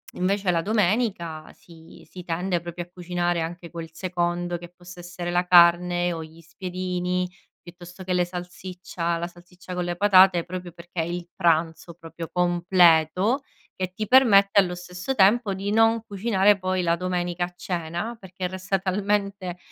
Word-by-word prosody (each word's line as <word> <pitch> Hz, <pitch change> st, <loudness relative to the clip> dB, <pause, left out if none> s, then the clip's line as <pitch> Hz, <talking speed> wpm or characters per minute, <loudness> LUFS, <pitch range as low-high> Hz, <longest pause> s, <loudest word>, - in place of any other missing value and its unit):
invece 195 Hz, +1 st, 0 dB
la 170 Hz, -1 st, +1 dB
domenica 195 Hz, -5 st, -1 dB
si 165 Hz, -1 st, -17 dB
si 180 Hz, -, -10 dB
tende 175 Hz, +1 st, -1 dB
proprio 175 Hz, 0 st, -6 dB
a 175 Hz, -, -19 dB
cucinare 175 Hz, -1 st, -1 dB
anche 170 Hz, +1 st, -6 dB
quel 165 Hz, -1 st, -7 dB
secondo 175 Hz, 0 st, -2 dB
che 175 Hz, 0 st, -11 dB
possa 180 Hz, 0 st, -13 dB
essere 175 Hz, 0 st, -6 dB
la 175 Hz, +1 st, +1 dB
carne 175 Hz, 0 st, +5 dB
o 165 Hz, -, -5 dB
gli 160 Hz, +1 st, -14 dB
spiedini, 180 Hz, +1 st, -3 dB, 0.3 s
piuttosto 175 Hz, +1 st, -12 dB
che 185 Hz, -, -5 dB
le 180 Hz, 0 st, +2 dB
salsiccia 180 Hz, -1 st, -5 dB
la 170 Hz, +1 st, -3 dB
salsiccia 180 Hz, +2 st, -12 dB
con 180 Hz, -1 st, -2 dB
le 175 Hz, 0 st, -2 dB
patate, 185 Hz, -2 st, +5 dB
proprio 180 Hz, -1 st, -7 dB
perché 175 Hz, 0 st, -9 dB
il 175 Hz, +1 st, -5 dB
pranzo 165 Hz, -1 st, 0 dB
proprio 165 Hz, 0 st, -9 dB
completo 180 Hz, -, +3 dB, 0.4 s
che 185 Hz, -1 st, -3 dB
ti 215 Hz, +3 st, -4 dB
permette 200 Hz, -6 st, +6 dB
allo 180 Hz, -2 st, +1 dB
stesso 180 Hz, +8 st, -5 dB
tempo 205 Hz, 0 st, +4 dB
di 195 Hz, +2 st, -3 dB
non 225 Hz, +1 st, +3 dB
cucinare 205 Hz, -1 st, +2 dB
poi 185 Hz, 0 st, -1 dB
la 170 Hz, -1 st, +1 dB
domenica 175 Hz, -1 st, -2 dB
a 180 Hz, -, -12 dB
cena 175 Hz, +6 st, -4 dB
perché 185 Hz, -2 st, -7 dB
resta 190 Hz, +1 st, -2 dB
talmente 200 Hz, -1 st, -2 dB
180 Hz, 160 wpm, -24 LUFS, 175-190 Hz, 0.4 s, permette